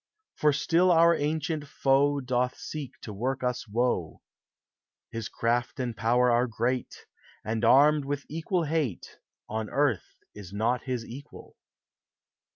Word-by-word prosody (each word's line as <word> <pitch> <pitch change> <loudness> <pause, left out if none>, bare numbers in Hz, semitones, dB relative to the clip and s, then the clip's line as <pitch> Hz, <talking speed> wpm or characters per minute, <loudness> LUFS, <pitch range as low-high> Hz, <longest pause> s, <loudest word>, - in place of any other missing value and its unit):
For 150 - +3
still 165 +5 +2
our 170 0 +6
ancient 150 0 -2
foe 140 +1 +2
Doth 125 0 -1
seek 155 -4 -6
to 105 - -7
work 130 +6 -2
us 125 -1 -2
woe; 110 -7 -1 0.9
His 115 -2 -5
craft 120 +3 -1
and 120 -3 -2
power 120 +2 +3
are 120 +2 +3
great, 120 +2 -2 0.4
And, 110 +1 -2
armed 145 +4 +5
with 140 0 -3
equal 165 +3 -1
hate, 150 - -2 0.3
On 110 0 -3
earth 140 -8 0 0.2
is 100 -3 -10
not 115 +4 0
his 125 -3 -3
equal. 140 +5 -11
130 Hz, 135 wpm, -28 LUFS, 115-145 Hz, 0.9 s, our